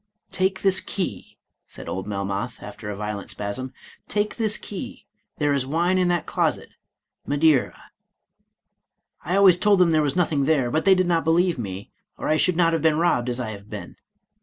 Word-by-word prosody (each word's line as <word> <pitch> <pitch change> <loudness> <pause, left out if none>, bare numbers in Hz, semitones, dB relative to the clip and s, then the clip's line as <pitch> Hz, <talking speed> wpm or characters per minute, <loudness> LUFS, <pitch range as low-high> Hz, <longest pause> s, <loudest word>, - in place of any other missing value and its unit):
"Take 190 0 0
this 195 -1 +3
key," 140 - -5 0.3
said - - -10
old 95 +1 -4
Melmoth, 100 +3 -4
after 105 - -8
a 105 - -4
violent 105 -1 -5
spasm; 105 +6 -4 0.2
" - - -27
take 210 +1 0
this 220 -3 +1
key, 200 - -8 0.3
there 145 -2 +1
is 140 -2 +1
wine 170 +7 +1
in 180 - +2
that 175 -1 0
closet, - - -1 0.3
— - - -41
Madeira. 145 -1 +1 1.3
I 175 +5 -1
always 190 -3 +6
told 210 0 +4
them 180 -2 +4
there 155 -1 +3
was 145 0 -1
nothing 155 -6 +1
there, 135 -5 +2
but 155 - 0
they 195 -1 +6
did 185 0 +2
not 170 -2 +1
believe 170 -1 +2
me, 100 -3 -6 0.3
or - - -3
I 155 - +3
should 180 +1 +2
not 165 -2 +3
have 165 - 0
been 155 -1 +3
robbed 145 -8 +1
as 120 0 -2
I 115 -3 -3
have 100 0 -11
been. - - -8
155 Hz, 195 wpm, -23 LUFS, 120-180 Hz, 1.3 s, always